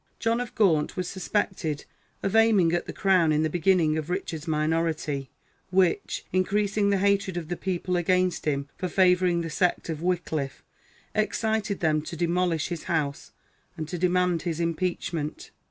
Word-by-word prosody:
John 230 +1 0
of 245 - -6
Gaunt 165 -8 +2
was 180 -1 -2
suspected 180 -5 -2 0.4
of 195 - -1
aiming 215 -7 +5
at 175 - -1
the - - -4
crown 185 -5 +3
in 155 +1 +2
the 155 - 0
beginning 170 -3 +2
of 155 +1 -6
Richard's 170 -3 -3
minority, 155 -3 -1 0.4
which, 185 -2 +1
increasing 200 +2 +1
the 200 - +3
hatred 195 -2 +1
of 165 -2 -5
the 175 - -1
people 180 0 -2
against 180 +1 +1
him 140 -2 0
for 185 - -3
favouring 180 -1 +3
the 165 - -4
sect 180 +1 0
of 160 -1 -3
Wickliffe, 165 -6 -2 0.5
excited 215 -1 0
them 155 -2 +2
to 165 +2 -7
demolish 170 -1 0
his 170 -3 -5
house 150 -5 -2 0.5
and 155 - -4
to 175 - -4
demand 180 -1 +2
his 165 -2 -3
impeachment." 170 -2 -2
175 Hz, 160 wpm, -26 LUFS, 160-190 Hz, 0.5 s, aiming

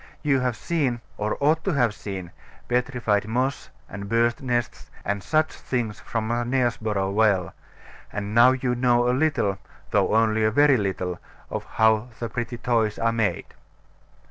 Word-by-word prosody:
You 140 -3 +3
have 125 -2 0
seen, 140 -7 -1 0.2
or 105 0 -2
ought 155 +3 +2
to 195 - 0
have 120 -6 +2
seen, 95 -5 -7 0.4
petrified 120 -5 0
moss 130 +4 -1 0.2
and 100 0 -7
birds' 115 +2 +2
nests 120 -3 -2 0.2
and 100 0 -1
such 155 +7 +1
things 115 -5 -3
from 115 -1 -3
Knaresborough 120 -5 0
Well: 100 -4 +2 0.6
and 105 0 -4
now 120 +3 +7
you 125 -1 -1
know 120 -1 +2
a 125 - +3
little, 130 -9 +1 0.3
though - - +2
only 110 -1 +3
a 110 - +4
very 145 +3 +4
little, 95 -3 -2 0.3
of - - -4
how 110 +1 +2
the 115 - -3
pretty 120 +1 -4
toys 115 -3 0
are 115 0 +1
made. 105 -7 0
115 Hz, 155 wpm, -24 LUFS, 105-125 Hz, 0.6 s, now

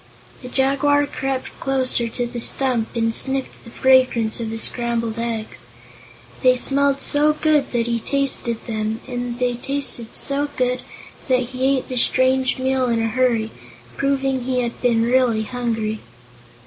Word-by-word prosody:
The 250 - -8
Jaguar 280 +2 +2
crept 270 -2 -4
closer 260 -3 0
to 240 +2 -3
the 240 0 -5
stump 250 -3 +1
and 225 -1 +1
sniffed 265 +2 -3
the - - -12
fragrance 255 -3 +3
of 225 -1 -3
the 225 - -4
scrambled 230 0 -2
eggs. 230 -2 -3 0.7
They 255 -1 +5
smelled 275 +2 +3
so 300 +1 +3
good 305 -1 +1
that 235 -2 0
he 235 -1 -1
tasted 260 -3 -1
them, 220 -1 -3
and 245 -1 -4
they 250 -1 0
tasted 245 -2 -1
so 285 +1 0
good 250 0 0 0.5
that 255 -2 +1
he 265 +1 +1
ate - - -5
the 255 - -4
strange 260 +1 +2
meal 260 0 0
in 230 -1 +1
a 225 0 0
hurry, 230 -2 +1 0.4
proving 270 -1 0
he 255 -1 0
had 235 -1 -4
been 235 -2 +2
really 240 -2 +2
hungry. 225 -2 -3
250 Hz, 155 wpm, -21 LUFS, 230-265 Hz, 0.7 s, They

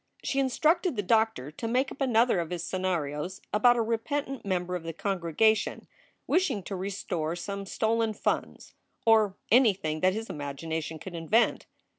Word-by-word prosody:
She 275 - 0
instructed 310 +5 +2
the 205 - -1
doctor 220 - +1
to 230 +9 -5
make 255 +4 +1
up 280 - -10
another 235 -5 +3
of 165 -2 -3
his 175 -1 -4
scenarios 175 -2 -2
about 240 +3 +5
a 230 - +2
repentant 265 +4 -2
member 180 -2 -1
of 180 - -3
the 165 0 -6
congregation 195 +4 +1 0.4
wishing 350 - +1
to 195 - -5
restore 180 -4 -3
some 195 +2 -5
stolen 225 +1 0
funds - - -2 0.3
or 220 -3 +4 0.2
anything 195 -10 +3
that 185 +3 +3
his 220 +2 -4
imagination 160 +3 -4
could 185 +3 -9
invent. 170 +8 +1
200 Hz, 155 wpm, -28 LUFS, 170-230 Hz, 0.4 s, about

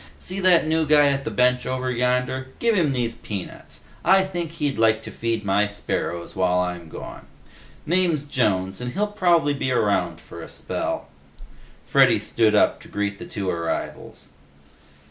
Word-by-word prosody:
"See 185 +2 -3
that 185 -4 +4
new 160 0 +1
guy 145 -1 +5
at 140 0 -2
the - - -1
bench 125 0 +2
over 130 0 -2
yonder? 125 +1 0
Give 235 -1 +2
him 170 -8 +2
these 120 -3 -1
peanuts. 100 -5 -8 0.2
I 190 +1 +5
think 175 -4 -4
he'd 145 -7 -2
like 110 0 +3
to - - -8
feed 115 -2 -2
my 100 +1 +2
sparrows 95 -4 -4
while 90 -1 +2
I'm 90 -2 -2
gone. - - -9 0.6
Name's 170 -3 +1
Jones, 95 -8 -1
and 125 0 -4
he'll 210 - +1
probably 175 -7 +2
be 130 -2 -2
around 105 -5 +1
for - - -11
a - - -9
spell." - - -4 0.8
Freddy - - +5
stood 110 -2 +1
up - - +3
to - - -14
greet 100 -1 -3
the - - -8
two 100 -2 -4
arrivals. 85 -1 -4
125 Hz, 165 wpm, -23 LUFS, 105-155 Hz, 0.8 s, guy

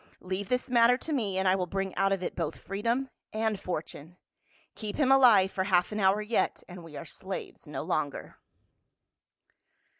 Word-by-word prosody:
Leave 185 +2 -4
this 250 0 0
matter 240 0 +5
to 310 +4 -4
me 210 -9 -1
and 190 0 +1
I 185 - +5
will 185 -2 -1
bring 195 +1 -3
out 195 0 +1
of 195 -2 0
it - - -3
both 165 -4 -3
freedom 235 +7 -2 0.2
and 215 -2 -1
fortune. 170 -1 -6 0.6
Keep 215 -2 -5
him 270 -3 +2
alive 230 -8 +6
for 190 - -1
half 180 -1 +2
an 210 - -3
hour 200 +2 +3
yet, 220 +2 0
and 180 -1 -10
we 165 -2 -11
are - - -7
slaves - - -7
no - - -5
longer." - - -3
195 Hz, 180 wpm, -29 LUFS, 185-230 Hz, 0.6 s, alive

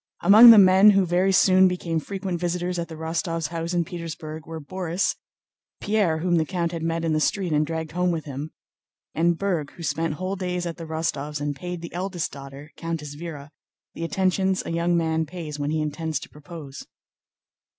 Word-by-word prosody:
Among 220 +4 +9
the 225 - +10
men 190 +1 +7
who 195 -2 +4
very 180 +2 +2
soon 190 0 +5
became 175 -3 -2
frequent 190 +1 -4
visitors 175 0 -2
at 170 - -3
the 160 - -9
Rostóvs' 165 +1 -2
house 165 0 -4
in 170 -1 +1
Petersburg 160 -2 -7
were 165 0 -6
Borís, 180 +3 -2 0.6
Pierre 205 -7 +1
whom 175 +1 +1
the 160 - +3
count 175 -3 -1
had 165 -2 -5
met 165 0 -1
in 160 - +1
the 155 - +2
street 180 +1 0
and 150 0 +2
dragged 160 -1 -4
home 180 +1 0
with 165 -3 -2
him, 145 +1 -6 0.6
and 170 +1 +2
Berg 175 -7 -1
who 170 - -10
spent 165 -1 -1
whole 185 +4 -3
days 180 -2 -3
at 170 -1 -5
the 165 - -7
Rostóvs' 150 -2 -3
and 145 0 -2
paid 175 +4 -6
the 170 - -8
eldest 180 -1 -3
daughter, 140 +2 -10
Countess 160 -3 -5
Véra, 150 -3 -8 0.4
the 165 - -6
attentions 190 +2 0
a - - -4
young 170 +1 +1
man 160 -1 0
pays 155 -3 -7
when 145 0 -1
he 155 +1 0
intends 155 0 -3
to - - -10
propose. 150 -2 -10
165 Hz, 195 wpm, -24 LUFS, 155-180 Hz, 0.6 s, the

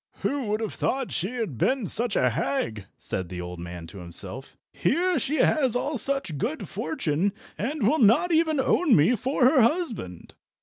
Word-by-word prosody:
"Who 275 -5 -1
would 210 +2 -1
have 220 - -3
thought 265 -1 -2
she 195 +8 -2
had 210 - -4
been 260 -4 +1
such 225 +3 +1
a 125 - +3
hag?" 110 -5 -2
said 95 -2 -4
the 90 - -6
old 90 0 -6
man 85 0 -7
to 90 +4 -11
himself. 95 +9 -4 0.2
"Here 345 - +1
she 280 +3 -1
has 270 -5 +2
all 275 +2 -1
such 270 - -1
good 300 - -3
fortune, 190 - -1 0.2
and 255 0 -1
will 310 +6 +2
not 240 - +4
even 320 -2 +2
own 275 +2 +3
me 165 +11 +4
for 255 +3 +1
her 265 0 +5
husband!" 230 - -1
225 Hz, 180 wpm, -26 LUFS, -, 0.2 s, her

